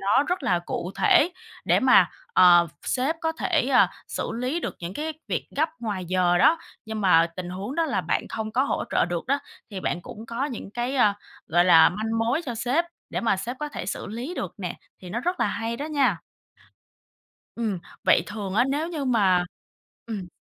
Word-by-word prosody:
nó 200 +7 +3
rất 360 -2 -2
là 180 -7 +2
cụ 175 +1 -5
thể 330 - +4 0.3
để - - +3
mà, - - +6 0.2
ờ, 175 -2 +7
sếp 270 +6 0
có 320 0 0
thể, 320 -5 0
à, 250 - +5 0.2
xử - - -3
lý 250 +8 -2
được - - -4
những 175 +2 -6
cái 315 +5 -3 0.2
việc - - -2
gấp 315 +2 +2
ngoài 205 -5 -3
giờ 180 -1 +2
đó. 325 - +5 0.3
Nhưng 220 0 -5
mà 170 -4 +5
tình 180 -1 -5
huống 195 +9 -5
đó 330 - +1
là - - 0
bạn - - -1
không 220 -1 -4
có 255 +3 +3
hỗ - - -1
trợ - - +3
được 175 -1 -3
đó, 280 +2 +2 0.3
thì 195 -3 -5
bạn 175 - -2
cũng 220 +2 -10
có 235 +4 -2
những 250 -8 -6
cái, 240 +5 -2
ơ, 210 -5 +5 0.4
gọi 175 +2 +4
là, 165 -3 +7
manh 220 +4 -2
mối 235 +9 +1
cho 245 - -3
sếp 250 +9 +1 0.3
để - - -2
mà 225 -4 +2
sếp 240 +7 -5
có 300 - -2
thể 235 - -6
xử - - -4
lý 245 - -5
được 185 - -4
nè, 180 -3 -4 0.3
thì 180 - -8
nó 235 - -2
rất 355 -2 -2
là 235 - +3
hay 230 +3 -3
đó 290 +4 -4
nha. 270 - +2 1.4
Ừm, 220 -5 -2 0.3
vậy - - +5
thường 205 -3 -5
á, 240 +4 +4
nếu 290 +4 -1
như 315 -5 -3
mà 195 -8 +3 0.6
ừm. 205 -5 -5
225 Hz, 210 wpm, -25 LUFS, 185-275 Hz, 1.4 s, ờ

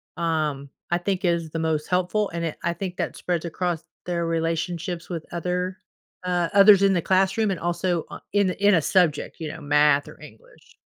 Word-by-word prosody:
um, 155 -4 -1 0.2
I 175 - +2
think 190 +1 -2
is 170 -2 0
the 165 - -4
most 160 -2 -1
helpful 185 +3 0
and 170 0 -3
it 160 - -4
I 170 - 0
think 180 +1 -5
that - - -3
spreads 175 -2 -2
across 170 -1 -2 0.2
their 170 -1 -1
relationships 165 +2 -2
with 165 -3 -5
other, 180 +2 -2 0.4
uh, 175 -2 0
others 200 -1 +8
in 195 -1 +5
the 175 - +1
classroom 190 +4 +2
and 185 - -3
also 175 0 -1
o - - -8
in 200 -2 +2
a - - -3
in 205 0 +3
a 165 - +3
subject, 165 -3 +1
you 160 -2 -4
know, - - -9
math 145 0 +3
or - - -13
english. - - -16
175 Hz, 200 wpm, -24 LUFS, 165-185 Hz, 0.4 s, others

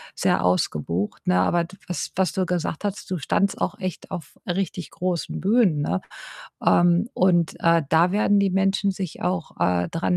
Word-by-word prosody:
sehr - - +1
ausgebucht, 90 +1 -1
ne? 90 - +3
Aber 170 - +2
d 190 +3 -14
was 180 - -4
was 190 0 +1
du 185 -1 0
gesagt 175 0 -2
hast, 205 0 -4
du 180 - 0
standest 200 +7 0
auch 205 - -1
echt 185 -2 -5
auf 175 -6 -7
richtig 180 -1 -2
großen 180 -2 -3
Bühnen, 195 -7 +3
ne? 90 -7 -1 0.6
Ähm, 175 +5 +4
und, 175 -3 +2
äh, 165 -1 +4
da 170 +3 +4
werden 205 0 +3
die 200 -1 +2
Menschen 195 +1 +1
sich 185 -3 -6
auch, 180 -2 -2
äh, 90 0 +1
dran 175 +2 0
180 Hz, 175 wpm, -24 LUFS, 160-190 Hz, 0.6 s, Ähm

